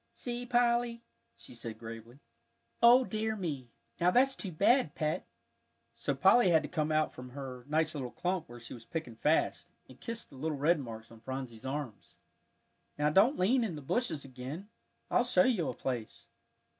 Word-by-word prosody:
"See, 245 Hz, 0 st, -4 dB
Polly," 240 Hz, -1 st, +2 dB, 0.3 s
she -, -, -13 dB
said 115 Hz, -2 st, -6 dB
gravely. 115 Hz, +4 st, -10 dB, 0.6 s
"O 245 Hz, +2 st, +8 dB
dear 220 Hz, -1 st, -1 dB
me, 150 Hz, -, -4 dB, 0.3 s
now 175 Hz, -, +4 dB
that's 260 Hz, +7 st, +4 dB
too 190 Hz, -, -5 dB
bad, 200 Hz, -, +3 dB
Pet!" 155 Hz, 0 st, -1 dB, 0.7 s
So 115 Hz, +5 st, -2 dB
Polly 190 Hz, -, +5 dB
had 160 Hz, -2 st, +4 dB
to -, -, -4 dB
come 155 Hz, -3 st, -1 dB
out 155 Hz, 0 st, +2 dB
from 125 Hz, 0 st, -9 dB
her 130 Hz, -2 st, -7 dB
nice 155 Hz, +1 st, +1 dB
little 135 Hz, -5 st, -4 dB
clump 180 Hz, +2 st, -2 dB
where 120 Hz, 0 st, -10 dB
she 115 Hz, -, -9 dB
was 115 Hz, -, -10 dB
picking 125 Hz, -3 st, -5 dB
fast, 150 Hz, +8 st, +1 dB, 0.2 s
and -, -, -16 dB
kiss 230 Hz, -1 st, -5 dB
the 135 Hz, -, -15 dB
little 155 Hz, +2 st, -2 dB
red 155 Hz, +4 st, +3 dB
marks 115 Hz, -4 st, -8 dB
on 115 Hz, -, -13 dB
Phronsie's 130 Hz, -1 st, -6 dB
arms. 135 Hz, -7 st, -6 dB, 0.8 s
"Now 150 Hz, +1 st, +2 dB
don't 210 Hz, -, +5 dB
lean 235 Hz, +7 st, +3 dB
in 195 Hz, -8 st, -2 dB
the 150 Hz, -, -7 dB
bushes 160 Hz, -, -1 dB
again; 135 Hz, +9 st, -7 dB, 0.4 s
I'll -, -, +4 dB
show 190 Hz, -7 st, +4 dB
you 210 Hz, -, +1 dB
a -, -, -4 dB
place. 120 Hz, -4 st, -4 dB
155 Hz, 180 wpm, -32 LUFS, -, 0.8 s, O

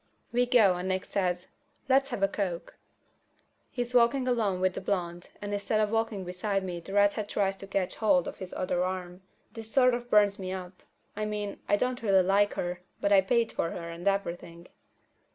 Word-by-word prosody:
We 245 Hz, +1 st, +2 dB
go 235 Hz, -6 st, +5 dB
out -, -, -4 dB
and 180 Hz, +1 st, -4 dB
Nick 185 Hz, 0 st, -1 dB
says, 180 Hz, -2 st, -1 dB, 0.4 s
"Let's 270 Hz, +1 st, +3 dB
have 225 Hz, -6 st, -3 dB
a -, -, +6 dB
coke." 190 Hz, -4 st, -4 dB, 0.9 s
He's 245 Hz, -1 st, -4 dB
walking 250 Hz, +2 st, +3 dB
along 215 Hz, -7 st, +1 dB
with 185 Hz, 0 st, +1 dB
the -, -, -5 dB
blonde, 175 Hz, -3 st, -3 dB
and 205 Hz, 0 st, -4 dB
instead 205 Hz, +1 st, 0 dB
of 210 Hz, -1 st, +1 dB
walking 225 Hz, -3 st, -1 dB
beside 195 Hz, +2 st, -2 dB
me 180 Hz, -2 st, -4 dB
the 195 Hz, +3 st, -9 dB
redhead 205 Hz, +1 st, +2 dB
tries 195 Hz, -1 st, 0 dB
to 195 Hz, -, -7 dB
catch 195 Hz, -1 st, -2 dB
hold 185 Hz, -5 st, +3 dB
of -, -, -6 dB
his 185 Hz, -1 st, -8 dB
other 180 Hz, -1 st, -1 dB
arm. 185 Hz, 0 st, -4 dB, 0.3 s
This 225 Hz, -1 st, -9 dB
sort 255 Hz, -1 st, +4 dB
of 240 Hz, 0 st, -4 dB
burns 205 Hz, -1 st, +4 dB
me 185 Hz, -1 st, -4 dB
up. 185 Hz, -1 st, -8 dB, 0.3 s
I 215 Hz, +1 st, -2 dB
mean, 210 Hz, -1 st, -4 dB
I -, -, +5 dB
don't 250 Hz, +4 st, -1 dB
really 195 Hz, -4 st, +4 dB
like 200 Hz, +2 st, +2 dB
her, 175 Hz, 0 st, -3 dB, 0.2 s
but 200 Hz, -, 0 dB
I 195 Hz, -, +7 dB
paid 230 Hz, +4 st, +1 dB
for 165 Hz, -, -1 dB
her 170 Hz, -1 st, -6 dB
and 170 Hz, +3 st, -6 dB
everything. 175 Hz, -3 st, -2 dB
200 Hz, 205 wpm, -29 LUFS, 180-220 Hz, 0.9 s, I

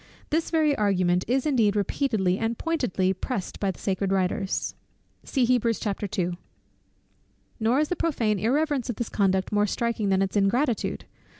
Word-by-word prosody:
This 320 Hz, +2 st, +1 dB
very 310 Hz, -3 st, +2 dB
argument 185 Hz, -4 st, +1 dB
is 255 Hz, +3 st, +1 dB
indeed 230 Hz, -9 st, +2 dB
repeatedly 205 Hz, -3 st, 0 dB
and 225 Hz, 0 st, -1 dB
pointedly 245 Hz, -, 0 dB
pressed 195 Hz, +1 st, -4 dB
by 200 Hz, -, 0 dB
the 190 Hz, -, -4 dB
sacred 195 Hz, 0 st, -1 dB
writers. 190 Hz, 0 st, 0 dB, 0.6 s
Nor 250 Hz, -3 st, +2 dB
is 230 Hz, -, 0 dB, 2.1 s
the 360 Hz, -, 0 dB
prophane 230 Hz, -, 0 dB
irreverence 275 Hz, +3 st, 0 dB
of 240 Hz, -, -1 dB
this 235 Hz, -, -4 dB
conduct 190 Hz, -2 st, +1 dB
more 210 Hz, 0 st, +2 dB
striking 230 Hz, -2 st, -1 dB
than 190 Hz, 0 st, +3 dB
its 195 Hz, -, -3 dB
ingratitude. 225 Hz, +5 st, +1 dB
215 Hz, 135 wpm, -26 LUFS, 195-255 Hz, 2.1 s, than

